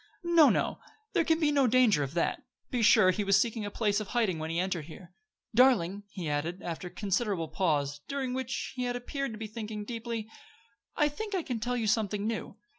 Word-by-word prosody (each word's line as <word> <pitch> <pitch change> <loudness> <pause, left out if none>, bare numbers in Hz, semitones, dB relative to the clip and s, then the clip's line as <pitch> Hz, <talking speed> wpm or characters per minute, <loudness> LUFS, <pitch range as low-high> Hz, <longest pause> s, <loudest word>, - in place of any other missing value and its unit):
"No, 340 -3 +6
no; - - 0 0.3
there 335 - +3
can 320 0 +2
be 305 -3 +3
no 280 -3 +3
danger 235 -9 +4
of 140 +3 -4
that. 170 - 0 0.3
Be 245 - 0
sure, 210 -3 +6
he 205 +3 -1
was 195 0 +4
seeking 225 -3 -1
a - - -3
place 205 -1 0
of 215 - -5
hiding 210 -9 0
when 160 +1 -4
he 165 - -2
entered 180 -4 -1
here. 170 +2 -12 0.4
Darling!" 210 -6 +4
he 185 -4 -6
added, 160 +5 -2
after 170 +1 -5
a - - -7
considerable 195 -2 -1
pause, 145 -4 0
during 270 -2 -2
which 260 0 -3
he 250 -1 -2
had 245 0 -1
appeared 275 +2 -3
to - - -7
be 220 - -5
thinking 215 -1 -6
deeply, 230 -1 -4 0.7
"I 295 - +3
think 405 +8 -4
I 360 - -1
can 245 -6 -3
tell 245 +2 -1
you 230 - -1
something 210 -1 0
new. 225 0 -3
215 Hz, 215 wpm, -30 LUFS, 185-250 Hz, 0.7 s, No